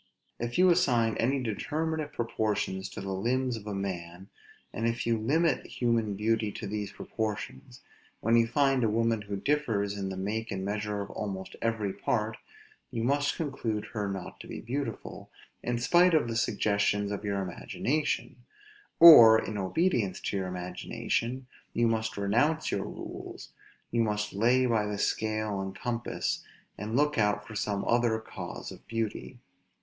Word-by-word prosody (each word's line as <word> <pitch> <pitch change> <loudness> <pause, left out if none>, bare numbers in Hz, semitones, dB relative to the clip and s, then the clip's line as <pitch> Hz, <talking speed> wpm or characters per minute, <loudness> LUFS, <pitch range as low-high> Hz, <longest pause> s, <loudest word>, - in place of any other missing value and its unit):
If 120 +1 -3
you 185 0 +6
assign 120 - +3
any 130 +3 +1
determinate 155 +7 -2
proportions 105 -5 -1
to 95 - -7
the 95 0 -3
limbs 125 +5 0
of 105 -2 -9
a 105 - -3
man, 95 -1 -5 0.4
and 115 - -1
if 115 +1 -1
you 115 0 +2
limit 155 +7 +1
human 115 -4 0
beauty 110 +1 0
to - - -6
these 105 0 -3
proportions, 110 +3 -5 0.4
when 115 +2 +2
you 115 -1 +5
find 135 0 +2
a 110 - +3
woman 115 0 +1
who 100 -1 -5
differs 105 -4 0
in 100 -1 -3
the 95 - -5
make 110 +4 -2
and 95 -2 -3
measures 105 0 -2
of 100 - -10
almost 95 -2 -5
every 110 -4 -1
part, 110 +2 -1 0.5
you 115 -3 -3
must 145 +3 +1
conclude 130 -9 -2
her 105 -3 -2
not 95 -2 -6
to - - -10
be - - -6
beautiful, 135 +4 -5 0.3
in 120 0 -1
spite 175 +8 +4
of 150 -6 +3
the 115 - -3
suggestions 105 -2 +1
of 100 0 -4
your 100 -1 -1
imagination; 140 +10 -2 0.6
or, 120 -10 +11
in 110 - -4
obedience 105 - 0
to - - -2
your 95 -1 -2
imagination, 90 +7 -3 0.3
you 120 0 +2
must 110 -2 -1
renounce 120 +11 +1
your - - -1
rules; - - -8 0.4
you 115 - +2
must 105 -1 -1
lay 120 +5 +3
by 115 -3 +2
the 105 0 -3
scale 110 -1 -1
and 95 0 -5
compass, 120 +2 -2 0.3
and 105 +3 -4
look 150 -2 +2
out 105 0 +1
for 110 - -10
some 100 -1 -1
other 120 -1 +2
cause 110 - -7
of - - -13
beauty. 115 -2 -3
110 Hz, 165 wpm, -29 LUFS, 100-120 Hz, 0.6 s, or